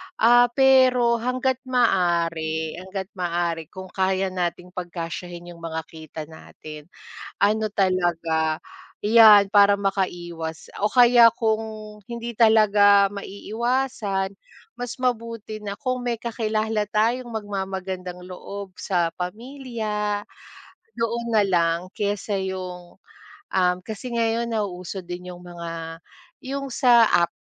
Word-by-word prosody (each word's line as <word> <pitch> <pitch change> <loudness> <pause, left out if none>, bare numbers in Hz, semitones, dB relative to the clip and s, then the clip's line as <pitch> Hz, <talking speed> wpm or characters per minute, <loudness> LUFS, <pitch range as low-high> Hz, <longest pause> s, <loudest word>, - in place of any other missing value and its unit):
Ah, 240 +2 +6
pero 255 -3 +5
hangga't 255 +2 -1
maaari 170 -8 +1
hangga't 190 +1 -6
maaari. 170 -2 -1
kung 185 +2 -10
kaya 190 0 0
nating 180 0 -3
pagkasyahin 175 0 -6
yung 170 - -13
mga 160 -1 -4
kita 160 0 -9
natin, 155 -1 -12 0.5
ano 215 +2 +2
talaga, 170 -5 0 0.4
'yan 210 -2 +7
para 200 0 +5
makaiwas 175 -5 -3
o - - -3
kaya 240 -2 +7
kung 220 -1 0 0.4
hindi 235 +1 -6
talaga 205 -3 +5
maiiwasan, 205 0 -2 0.4
mas 245 0 -6
mabuti 230 -3 -2
na 200 - -3
kung 255 -2 -2
may 235 -2 -2
kakilala 220 -2 -1
tayong 230 +4 0
magmamagandang 190 -3 -5
loob 190 +1 -8
sa 175 -4 0
pamilya, 215 0 -3 0.8
doon 235 +1 -1
na 220 -2 +4
lang 170 -3 +2
kesa 205 0 -2
yung, 185 -2 -6 0.6
um, 180 -1 +2
kasi 220 +3 -6
ngayon 230 +1 0
nauso 190 -4 -4
din 180 +1 -7
yung 180 0 -10
mga 165 -1 -7 0.4
yung 275 0 -5
sa 240 -3 +6
app 170 -1 +4
200 Hz, 110 wpm, -23 LUFS, 175-230 Hz, 0.8 s, yan